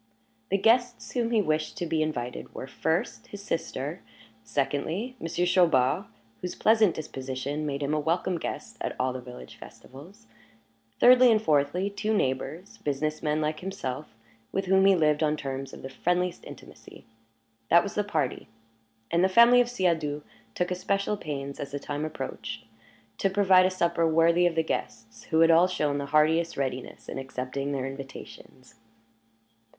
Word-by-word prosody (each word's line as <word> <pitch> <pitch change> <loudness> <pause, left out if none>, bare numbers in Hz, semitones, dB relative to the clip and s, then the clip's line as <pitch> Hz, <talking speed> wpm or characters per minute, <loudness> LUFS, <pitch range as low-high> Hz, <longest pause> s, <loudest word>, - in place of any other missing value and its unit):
The 195 - +2
guests 240 +4 +2
whom 235 -2 0
he 225 -3 +2
wished 155 -2 -1
to 175 - -2
be 160 -1 0
invited 125 -6 -4
were, - - -5
first, 135 -4 -2
his 200 -1 -9
sister; 160 -3 -3 0.4
secondly, 145 - -2
Monsieur 170 +2 -1
Chaubard, 175 -2 +3 0.4
whose 180 - -4
pleasant 220 -4 +4
disposition 140 0 -4
made 140 0 -3
him 140 +2 -1
a 155 - +1
welcome 170 +3 0
guest - - -6
at - - -3
all 130 0 0
the 130 - -6
village 125 - -11
festivals; 175 - -14 0.7
thirdly 250 0 +7
and 220 - +4
fourthly, 150 +3 +2
two 210 +2 -1
neighbors, 155 +4 -2
business 150 +2 -2
men 150 0 0
like 155 0 -1
himself, 155 -8 -5 0.4
with 195 0 -1
whom 190 +1 +4
he 195 - +6
lived 150 -3 +2
on 155 -1 +1
terms 135 -1 -5
of - - -11
the 135 - -6
friendliest 180 +3 -1
intimacy. - - -13 0.6
That 170 - +6
was 200 - -5
the 210 - 0
party; 155 -10 -2 0.6
and 170 +1 +3
the 190 - +4
family 235 +5 +7
of 245 - -1
Siadoux 160 -9 0 0.3
took 180 +1 -1
especial 195 +3 0
pains, 140 -7 -6
as 140 - -5
the - - -1
time 145 +2 -4
approached, 135 -7 -6 0.5
to 195 - +2
provide 190 -2 +5
a - - +1
supper 170 -2 +1
worthy 165 +2 +4
of 170 - -2
the 160 - +2
guests, 115 -7 -5
who 160 0 +2
had 165 0 +6
all 170 +2 +6
shown 150 -6 -1
the 140 - -4
heartiest 160 +3 +2
readiness 130 -2 -4
in - - -5
accepting 135 +1 -4
their 135 -2 -2
invitations. 135 -1 -10
160 Hz, 165 wpm, -27 LUFS, 140-185 Hz, 0.7 s, thirdly